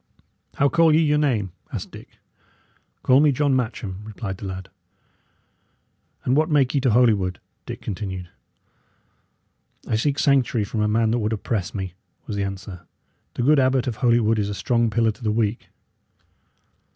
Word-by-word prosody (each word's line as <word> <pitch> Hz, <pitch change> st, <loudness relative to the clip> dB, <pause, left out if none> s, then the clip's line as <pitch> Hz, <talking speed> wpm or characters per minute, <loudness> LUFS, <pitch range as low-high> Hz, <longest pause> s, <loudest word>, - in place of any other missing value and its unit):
"How 140 Hz, -, +3 dB
call 165 Hz, 0 st, +4 dB
ye -, -, +5 dB
your 150 Hz, -2 st, +3 dB
name?" 115 Hz, -11 st, 0 dB, 0.2 s
asked -, -, -5 dB
Dick. -, -, -13 dB, 0.9 s
"Call 130 Hz, +1 st, +5 dB
me 150 Hz, 0 st, +5 dB
John 140 Hz, +1 st, +1 dB
Matcham," 110 Hz, -6 st, -3 dB
replied 105 Hz, -2 st, -6 dB
the 100 Hz, -, -7 dB
lad. 95 Hz, 0 st, -7 dB, 1.6 s
"And 130 Hz, -, +2 dB
what 155 Hz, +2 st, +2 dB
make 140 Hz, -4 st, +2 dB
ye 140 Hz, -, +1 dB
to 130 Hz, -, +2 dB
Holywood?" 105 Hz, -6 st, +2 dB, 0.3 s
Dick -, -, -6 dB
continued. 95 Hz, -3 st, -5 dB, 1.6 s
"I -, -, 0 dB
seek 140 Hz, +4 st, 0 dB
sanctuary 130 Hz, -6 st, +2 dB
from 105 Hz, +2 st, -3 dB
a 105 Hz, -, +2 dB
man 110 Hz, +1 st, +2 dB
that 120 Hz, -, +1 dB
would 110 Hz, 0 st, -1 dB
oppress 105 Hz, -3 st, -3 dB
me," 95 Hz, -3 st, -4 dB, 0.3 s
was 105 Hz, -, -5 dB
the 100 Hz, -, -1 dB
answer. 95 Hz, -3 st, -7 dB, 0.5 s
"The 120 Hz, -, -1 dB
good 145 Hz, +3 st, +5 dB
Abbot 130 Hz, -1 st, +2 dB
of 120 Hz, -4 st, -3 dB
Holywood 115 Hz, -3 st, +3 dB
is 100 Hz, -1 st, -1 dB
a 105 Hz, -, -4 dB
strong 120 Hz, +2 st, +1 dB
pillar 115 Hz, 0 st, +2 dB
to 110 Hz, -, -15 dB
the 110 Hz, -, +1 dB
weak." 110 Hz, 0 st, -1 dB
115 Hz, 165 wpm, -23 LUFS, 100-130 Hz, 1.6 s, ye